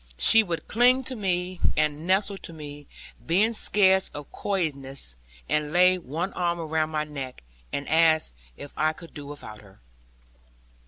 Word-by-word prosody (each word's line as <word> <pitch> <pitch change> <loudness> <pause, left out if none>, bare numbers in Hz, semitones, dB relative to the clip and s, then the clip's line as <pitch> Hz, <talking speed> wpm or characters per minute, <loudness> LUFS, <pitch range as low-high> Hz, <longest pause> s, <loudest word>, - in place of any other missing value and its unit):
She 225 - +7
would 175 -6 -4
cling 250 +3 +4
to 260 0 -5
me, 185 -3 -2 0.2
and 155 +1 0
nestle 195 +1 +1
to - - -8
me, 145 -2 -10 0.4
being 205 +7 +2
scared 190 -3 +3
of 145 -1 -8
coyishness, 140 - -3 0.3
and 150 -1 0
lay 180 +2 +5
one 170 +5 -4
arm 175 -1 -1
around 160 -1 -1
my 155 -1 -1
neck, 135 - -8 0.3
and 140 - -4
ask 160 - +3 0.2
if 145 - -8
I 155 +1 +1
could 165 +1 -13
do 145 -2 -9
without 110 -7 -9
her. 100 -2 -19
160 Hz, 155 wpm, -26 LUFS, 145-185 Hz, 0.4 s, She